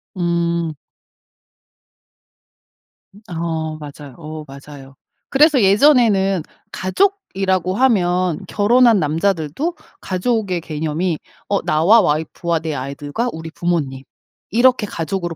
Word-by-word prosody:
음. 170 Hz, -2 st, -1 dB, 2.4 s
음 205 Hz, -, -16 dB
어 160 Hz, -2 st, -3 dB
맞아요, 145 Hz, -2 st, -10 dB
어 155 Hz, -1 st, -8 dB
맞아요. 135 Hz, 0 st, -12 dB, 0.3 s
그래서 290 Hz, -1 st, +4 dB
예전에는 200 Hz, -, +4 dB, 0.3 s
가족이라고 190 Hz, -, 0 dB
하면 185 Hz, -8 st, +2 dB
결혼한 230 Hz, +1 st, +4 dB
남자들도 165 Hz, -, -1 dB, 0.3 s
가족의 190 Hz, -2 st, -1 dB
개념이 160 Hz, +2 st, -2 dB, 0.3 s
어 200 Hz, -1 st, 0 dB
나와 175 Hz, +9 st, +4 dB
와이프와 160 Hz, +1 st, -1 dB
내 160 Hz, -1 st, -4 dB
아이들과 145 Hz, -, -4 dB
우리 160 Hz, -3 st, -7 dB
부모님 155 Hz, -7 st, -2 dB, 0.5 s
이렇게 240 Hz, +1 st, +3 dB
가족으로 175 Hz, 0 st, -4 dB
175 Hz, 240 characters per minute, -19 LUFS, 155-205 Hz, 2.4 s, 그래서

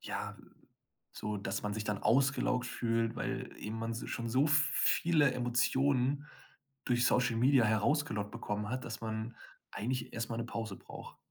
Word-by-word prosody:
ja, -, -, -4 dB, 0.8 s
so, 105 Hz, -1 st, -4 dB
dass 100 Hz, -1 st, -3 dB
man 105 Hz, 0 st, -1 dB
sich 110 Hz, 0 st, -3 dB
dann 105 Hz, -1 st, -2 dB
ausgelaugt 125 Hz, +1 st, +3 dB
fühlt, 115 Hz, -1 st, 0 dB
weil -, -, -3 dB
eben 110 Hz, +1 st, -5 dB
man 115 Hz, 0 st, -2 dB
s 115 Hz, -, -5 dB
schon 115 Hz, 0 st, -3 dB
so 130 Hz, +6 st, +3 dB
viele 150 Hz, 0 st, +3 dB
Emotionen 130 Hz, +3 st, +1 dB, 0.6 s
durch 120 Hz, 0 st, +2 dB
Social 125 Hz, -2 st, +3 dB
Media 130 Hz, 0 st, +5 dB
herausgelockt 110 Hz, -1 st, +1 dB
bekommen 105 Hz, -2 st, -3 dB
hat, 130 Hz, +2 st, -3 dB
dass 115 Hz, -1 st, -6 dB
man 110 Hz, +1 st, -4 dB, 0.4 s
eigentlich 125 Hz, +2 st, -3 dB
erst 115 Hz, 0 st, -3 dB
mal 115 Hz, -, -3 dB
'ne 115 Hz, -, -2 dB
Pause 110 Hz, -4 st, -5 dB
braucht. -, -, -11 dB
115 Hz, 160 wpm, -33 LUFS, 110-130 Hz, 0.8 s, Media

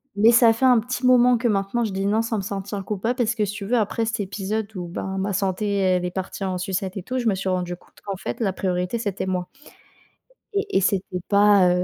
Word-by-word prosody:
mais 220 Hz, +3 st, +6 dB
ça 235 Hz, -1 st, +6 dB
fait 260 Hz, +4 st, 0 dB
un 250 Hz, -2 st, +6 dB
petit 250 Hz, +3 st, -3 dB
moment 250 Hz, -1 st, +6 dB
que 235 Hz, +1 st, 0 dB
maintenant 205 Hz, +3 st, 0 dB
je 210 Hz, -, -4 dB
dis: 195 Hz, +1 st, -2 dB
«Non» 220 Hz, +2 st, +2 dB
sans 225 Hz, -1 st, -2 dB
me -, -, -1 dB
sentir 200 Hz, 0 st, -4 dB
coupable 220 Hz, +5 st, -1 dB
parce 235 Hz, -2 st, +1 dB
que 215 Hz, -2 st, +1 dB
si 205 Hz, -, -4 dB
tu 200 Hz, -1 st, -6 dB
veux, 245 Hz, +4 st, +1 dB
après 225 Hz, +1 st, 0 dB
cet 225 Hz, -1 st, -2 dB
épisode, 200 Hz, +2 st, -3 dB
où, 180 Hz, -2 st, -5 dB
ben, 190 Hz, +2 st, -4 dB
ma 195 Hz, +2 st, -1 dB
santé, 200 Hz, +2 st, 0 dB
elle 185 Hz, -2 st, +2 dB
est 180 Hz, -, -3 dB
partie 190 Hz, +1 st, -5 dB
en 185 Hz, -1 st, -1 dB
sucette 190 Hz, +1 st, -3 dB
et 180 Hz, -, -5 dB
tout, 255 Hz, +3 st, -3 dB
je 240 Hz, -, -1 dB
me 205 Hz, -, +3 dB
suis 190 Hz, 0 st, -4 dB
rendu 180 Hz, -1 st, -1 dB
compte -, -, -23 dB
qu'en 200 Hz, -2 st, -4 dB
fait, -, -, -5 dB
la 200 Hz, -4 st, +1 dB
priorité, 180 Hz, +4 st, -1 dB
c'était 200 Hz, -4 st, -3 dB
moi 180 Hz, -1 st, -2 dB, 1.1 s
et 400 Hz, -, 0 dB
et -, -, +3 dB
c'était 190 Hz, -1 st, 0 dB
pas, 200 Hz, -2 st, +5 dB
heu, 180 Hz, 0 st, +2 dB
200 Hz, 255 wpm, -23 LUFS, 190-225 Hz, 1.1 s, mais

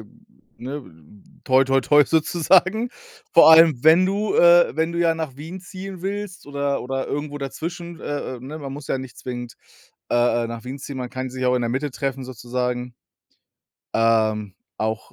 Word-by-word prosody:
äh, -, -, -11 dB, 0.5 s
ne, 140 Hz, +4 st, -6 dB, 0.6 s
toi 130 Hz, +1 st, +4 dB
toi 135 Hz, 0 st, +2 dB
toi 145 Hz, +3 st, +5 dB
sozusagen. 185 Hz, -, +2 dB, 0.4 s
Vor 170 Hz, -, +8 dB
allem, 160 Hz, -5 st, +6 dB
wenn 165 Hz, +4 st, +6 dB
du, 205 Hz, -, -1 dB
äh, -, -, +6 dB
wenn 160 Hz, +1 st, 0 dB
du 170 Hz, -, -4 dB
ja 165 Hz, -1 st, +3 dB
nach 160 Hz, -5 st, -5 dB
Wien 165 Hz, +6 st, -8 dB
ziehen 185 Hz, 0 st, -9 dB
willst 200 Hz, -2 st, -5 dB
oder 140 Hz, -1 st, -2 dB
oder 135 Hz, +1 st, -3 dB
irgendwo 145 Hz, 0 st, -4 dB
dazwischen, 170 Hz, +5 st, -6 dB
äh, 145 Hz, -2 st, -4 dB
äh, -, -, -13 dB
ne, 140 Hz, +5 st, -8 dB
man 140 Hz, -3 st, -7 dB
muss 140 Hz, 0 st, -9 dB
ja -, -, 0 dB
nicht 130 Hz, -2 st, -9 dB
zwingend, 120 Hz, -2 st, -6 dB, 0.6 s
äh, -, -, +2 dB
äh, 120 Hz, -1 st, +2 dB
nach 115 Hz, 0 st, -7 dB
Wien 130 Hz, +2 st, -6 dB
ziehen, 140 Hz, 0 st, -7 dB
man 125 Hz, -1 st, -5 dB
kann 130 Hz, 0 st, -5 dB
sich 130 Hz, 0 st, -3 dB
auch 125 Hz, -, +3 dB
in 125 Hz, -, +1 dB
der 120 Hz, -, -1 dB
Mitte 135 Hz, +3 st, -2 dB
treffen 135 Hz, 0 st, -3 dB
sozusagen. 125 Hz, 0 st, -4 dB, 1.0 s
Ähm, 110 Hz, -3 st, +2 dB, 0.2 s
auch, 110 Hz, 0 st, -3 dB
140 Hz, 185 wpm, -22 LUFS, 125-170 Hz, 1.0 s, Vor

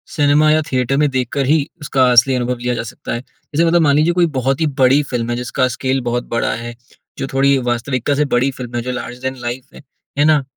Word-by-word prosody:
Cinema 150 Hz, 0 st, +4 dB
या 155 Hz, +1 st, +3 dB
theatre 130 Hz, +1 st, 0 dB
में 150 Hz, 0 st, +3 dB
देखकर 130 Hz, +1 st, -1 dB
ही 155 Hz, +4 st, +3 dB, 0.2 s
उसका 130 Hz, -3 st, +2 dB
असली 125 Hz, +2 st, +5 dB
अनुभव 125 Hz, 0 st, -1 dB
लिया 125 Hz, +1 st, -2 dB
जा 115 Hz, -, -3 dB
सकता 115 Hz, -, -7 dB
है। 120 Hz, -, -2 dB
जैसे 150 Hz, +4 st, -3 dB
मतलब 170 Hz, +1 st, +3 dB
मान 145 Hz, -3 st, +3 dB
लीजिए, 155 Hz, +3 st, +3 dB
कोई 175 Hz, 0 st, +3 dB
बहुत 135 Hz, +3 st, 0 dB
ही 160 Hz, -, +2 dB
बड़ी 130 Hz, +3 st, +5 dB
फ़िल्म 120 Hz, -2 st, -2 dB
है 120 Hz, -, -1 dB
जिसका 125 Hz, +1 st, -1 dB
स्केल 130 Hz, +1 st, -1 dB
बहुत 120 Hz, +1 st, -1 dB
बड़ा 115 Hz, -, 0 dB
है, 120 Hz, +1 st, -6 dB, 0.4 s
जो 135 Hz, -, -3 dB
थोड़ी 135 Hz, +1 st, +3 dB
वास्तविकता 125 Hz, +3 st, -1 dB
से 150 Hz, +1 st, +1 dB
बड़ी 125 Hz, +3 st, +3 dB
फ़िल्म 125 Hz, -2 st, -8 dB
है, 120 Hz, -, -1 dB
जो 125 Hz, +2 st, -4 dB
लार्ज 125 Hz, 0 st, -6 dB
दैन 130 Hz, 0 st, -3 dB
लाइफ़ 125 Hz, +4 st, -6 dB
है, -, -, -12 dB, 0.4 s
है 145 Hz, -, +3 dB
ना, 150 Hz, -2 st, +4 dB
130 Hz, 240 wpm, -17 LUFS, 120-145 Hz, 0.4 s, असली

